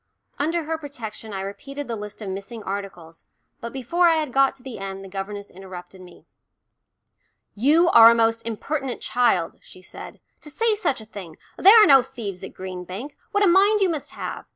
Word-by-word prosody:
Under 325 +3 0
her 320 +1 -3
protection 230 -7 -8
I 195 -1 -4
repeated 275 +9 -7
the 235 - -3
list 210 0 -8
of 200 - -5
missing 200 +4 -7
articles, 190 -5 -7 0.4
but 235 -3 -6
before 270 +8 +1
I 330 - +4
had 305 -5 -2
got 270 0 +3
to 260 - -19
the 260 -6 -8
end 195 0 -6
the - - -9
governess 200 +1 -6
interrupted 185 0 -11
me. 180 -1 -16 1.3
"You 300 +10 +3
are 230 -7 +9
a 235 - +4
most 225 0 +2
impertinent 255 +4 -4
child," 215 -8 +1
she 185 - -15
said, - - -11 0.2
"to 300 - -10
say 450 +8 +1
such 345 - -1
a - - -12
thing. 190 -7 -10 0.2
There 410 +5 +8
are 425 - +8
no 275 -7 +7
thieves 220 -8 -7
at 190 - -9
Green 185 -1 -7
Bank 200 +11 -8 0.2
what 410 0 +2
a - - +5
mind 400 +4 +5
you 385 -2 +2
must 315 -4 -4
have! - - -6
230 Hz, 200 wpm, -23 LUFS, 195-290 Hz, 1.3 s, are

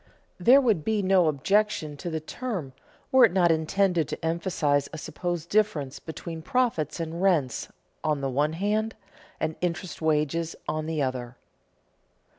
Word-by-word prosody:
There 245 +9 +7
would 220 - +2
be 215 +1 0
no 185 -3 +4
objection 155 +1 +1
to 175 - -5
the 160 -1 -2
term 175 - -5 0.4
were 260 -1 +7
it - - +1
not 175 -2 +4
intended 165 +1 +1
to - - -5
emphasize 160 -4 0
a 155 - -6
supposed 170 +2 -4
difference 160 -11 +1
between 160 0 -7
profits 205 - 0
and 165 +1 -4
rents 165 -10 +1 0.4
on 155 -2 +1
the 135 - -1
one 145 +4 +1
hand 210 +5 -1 0.4
and 160 - -1
interest 175 0 -3
wages 160 +1 0
on 155 0 -2
the 160 -3 0
other. 125 -2 -4
165 Hz, 150 wpm, -27 LUFS, 150-195 Hz, 0.4 s, There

